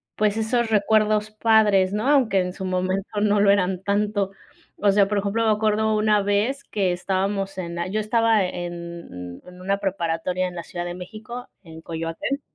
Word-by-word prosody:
pues 215 0 +1
esos 230 +1 0
recuerdos 215 0 +2
padres, 210 -3 +3
¿no?, 215 +5 -1
aunque 245 -9 +4
en 180 0 -1
su 190 - -6
momento 185 +2 -1
no 210 -1 +3
lo 200 -1 +6
eran 190 -1 +1
tanto, 205 -1 0 0.5
o 205 -1 +3
sea, 200 0 +4
por 205 0 0
ejemplo, 210 +3 0
me 220 - +4
acuerdo 215 0 +1
una 210 -1 +3
vez 210 +8 0
que 190 -4 -1
estábamos 195 +2 -2
en 170 -2 -4
la 170 +1 -2
yo 215 +3 -1
estaba 225 -1 +3
en 170 - -7
en 180 0 -13
una 195 +1 0
preparatoria 185 -1 -1
en 180 - -8
la 170 - -5
Ciudad 175 0 -5
de 175 0 -5
México, 220 +6 -8 0.2
en 160 -1 -11
Coyoacán, 165 - -4
200 Hz, 180 wpm, -23 LUFS, 180-215 Hz, 0.5 s, lo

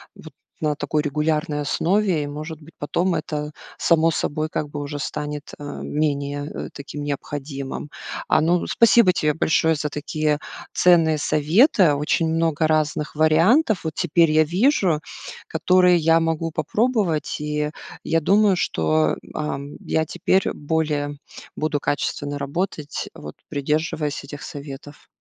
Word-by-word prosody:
вот - - -13 0.3
на 150 -1 0
такой 150 +1 -1
регулярной 150 0 0
основе 180 +1 +1
и, - - -4
может 155 +2 -6
быть, 160 +2 -15
потом 175 +5 0
это 150 -2 -3 0.3
само 165 -1 +3
собой 155 0 -1
как 150 -2 -3
бы 145 - -5
уже 145 0 -5
станет, 150 0 -5
э, - - -8 0.2
менее, 145 -1 -1
э, - - -6
таким 145 +1 -7
необходимым. 140 0 -5 0.4
А, - - +4
ну, 170 +2 +2
спасибо 230 -4 +5
тебе 150 -3 +1
большое 160 0 +2
за 150 0 -2
такие 150 +1 -1 0.3
ценные 165 -4 +4
советы, 160 - +4
очень 150 +3 +1
много 165 -1 +1
разных 155 -1 0
вариантов 170 - +3
вот 160 - -3
теперь 170 -2 +3
я 155 0 +5
вижу, 180 - +2 0.5
которые 180 +2 +4
я 165 0 +4
могу 165 0 -1
попробовать, 210 -4 0
и 150 0 -1 0.3
я 165 - +1
думаю, 200 +3 +4
что, 80 - +1
м, - - -15
ам, 145 -1 -4
я 160 0 0
теперь 190 +4 +1
более 150 -1 -1 0.4
буду 155 -1 -1
качественно 145 0 -2
работать, 150 +1 -3
вот 75 0 -10
придерживаясь 150 0 -1
этих 145 +2 -9
советов. 145 0 -9
155 Hz, 140 wpm, -22 LUFS, 145-165 Hz, 0.5 s, спасибо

